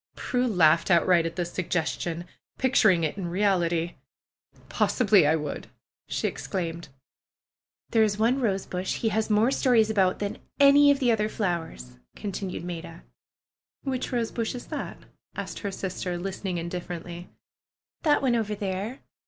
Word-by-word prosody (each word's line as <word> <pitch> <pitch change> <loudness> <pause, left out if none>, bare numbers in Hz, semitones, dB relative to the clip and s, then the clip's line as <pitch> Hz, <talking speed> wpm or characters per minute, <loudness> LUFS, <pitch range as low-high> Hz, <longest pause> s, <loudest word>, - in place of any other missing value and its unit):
Prue 250 0 -1
laughed 170 -6 +4
outright 170 -1 +4
at 165 - -7
this 175 -1 -3
suggestion, 170 -1 -2 0.3
picturing 215 -9 +4
it 160 +6 -2
in 180 - -3
reality. 175 -3 +1 0.7
"Possibly 205 - +3
I 155 - +4
would!" 150 -2 -4 0.4
she - - -1
exclaimed. 170 -3 -4 1.0
"There 225 - +4
is 210 -2 +2
one 240 +5 +2
rosebush 190 -4 -1
he 225 - 0
has 220 +1 -1
more 215 +4 +3
stories 235 -6 +3
about 190 -3 +2
than 205 -1 -3
about - - -28
any 285 +1 +7
of 285 - +5
the 255 -3 +2
other 215 -1 +1
flowers," 165 - -4 0.2
continued 195 -4 -5
Maida. 170 - -7 0.8
"Which 260 -2 -3
rosebush 230 -1 -2
is 245 - -7
that?" - - -5 0.4
asked - - -5
her 200 - -4
sister, 185 -1 -4
listening 190 0 -4
indifferently. 175 0 -6 0.7
"That 295 -3 +3
one 250 -3 +3
over 215 -2 -1
there!" 200 +5 -4
195 Hz, 145 wpm, -26 LUFS, 175-225 Hz, 1.0 s, any